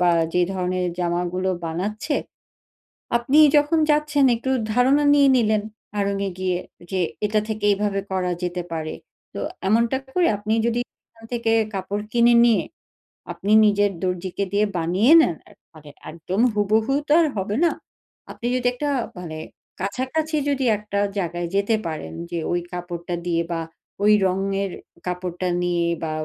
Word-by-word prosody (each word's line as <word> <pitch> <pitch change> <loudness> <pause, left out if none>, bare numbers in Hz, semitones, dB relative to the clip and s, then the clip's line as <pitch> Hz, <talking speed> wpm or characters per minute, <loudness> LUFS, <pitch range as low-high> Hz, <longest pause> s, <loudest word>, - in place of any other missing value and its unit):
বা 180 -1 +4 0.2
যেই 180 -1 +2
ধরনের 180 0 -1
জামাগুলো 180 +2 -1
বানাচ্ছে। 205 - -2 1.0
আপনি 250 +5 +2 0.2
যখন 295 +3 +3
যাচ্ছেন 295 -2 +2
একটু 260 +3 -3 0.2
ধারণা 265 +5 +3
নিয়ে 280 -1 +5
নিলেন 215 -3 +2 0.4
আড়ং 200 0 0
এ - - -4
গিয়ে 185 -1 0 0.3
যে 190 - -1 0.3
এটা 210 +1 +1
থেকে 215 -1 -4
এইভাবে 200 0 0
করা 185 -1 -1
যেতে 180 0 -2
পারে। 160 -1 -3 0.4
তো - - -4 0.3
এমনটা 230 +4 +3 0.2
করে 360 -1 +3
আপনি 210 +2 -3
যদি 235 +1 0 0.3
এখান 225 0 -19
থেকে 230 -1 0 0.2
কাপড় 200 +2 -3
কিনে 240 0 +5
নিয়ে 235 -2 +4 0.7
আপনি 205 - -3
নিজের 205 -1 +3
দর্জিকে 185 +1 -2
দিয়ে 210 +1 +3
বানিয়ে 185 - +2
নেন 175 - +1
এ - - -17 0.2
মানে 150 -2 -14 0.2
একদম 170 +6 -3
হুবহু 215 +5 +2
তো - - -3
আর 320 - +3
হবে 200 +2 -2
না। 335 - +3 0.6
আপনি 235 - -5
যদি 250 -1 0
একটা 290 +4 -2 0.3
মানে 160 -3 -6 0.4
কাছাকাছি 260 - -2
যদি 275 -1 0
একটা 205 -1 -3 0.2
জায়গায় 175 -1 -2
যেতে 200 +3 +2
পারেন 155 -1 -5 0.2
যে 170 - -2
ওই 175 - +1
কাপড়টা 175 -1 -5
দিয়ে 170 -1 +1
বা 165 - -1 0.4
ওই 210 +1 +6
রঙের 195 +1 -1 0.4
কাপড়টা 180 0 -3 0.2
নিয়ে 175 -1 +1 0.2
বা 160 - -2
200 Hz, 150 wpm, -23 LUFS, 180-235 Hz, 1.0 s, ওই